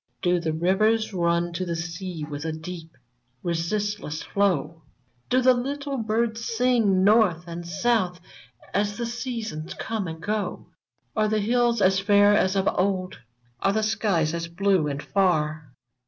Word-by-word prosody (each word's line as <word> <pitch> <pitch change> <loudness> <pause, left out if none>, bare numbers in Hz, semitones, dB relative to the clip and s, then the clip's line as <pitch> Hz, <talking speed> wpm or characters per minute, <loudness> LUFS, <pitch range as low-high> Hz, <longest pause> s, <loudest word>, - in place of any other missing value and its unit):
Do 180 -1 +3
the 165 -1 -1
rivers 215 +8 +2
nm 170 -2 0
to 175 +2 -2
the 170 -2 -2
sea 170 0 -5
With 145 -1 -6
a 160 - -2
deep, 165 -1 -8 0.5
resistless 175 0 -2
flow? 175 -5 0 0.5
Do 255 +1 +3
the 255 0 +7
little 280 +3 -3
birds 225 0 -1
sing 230 -5 +2
north 200 -5 +4
and 170 0 -7
south 190 -1 0 0.5
As 205 0 0
the 235 - -2
seasons 230 -9 -5
come 220 -4 -3
and 160 0 -6
go 210 +4 -3
f - - -40 0.2
" - - -47
Are 215 -1 +2
the 215 0 +1
hills 235 0 +2
as 190 +1 +4
fair 205 +1 +5
as 190 -2 +2
of 195 0 +1
old? 185 -1 -1 0.4
Are 195 - +1
the 220 +1 +1
skies 195 -7 +1
as 170 0 -3
blue 185 -1 +1
and 145 0 -4
far 155 -6 0
195 Hz, 160 wpm, -25 LUFS, 170-220 Hz, 0.5 s, the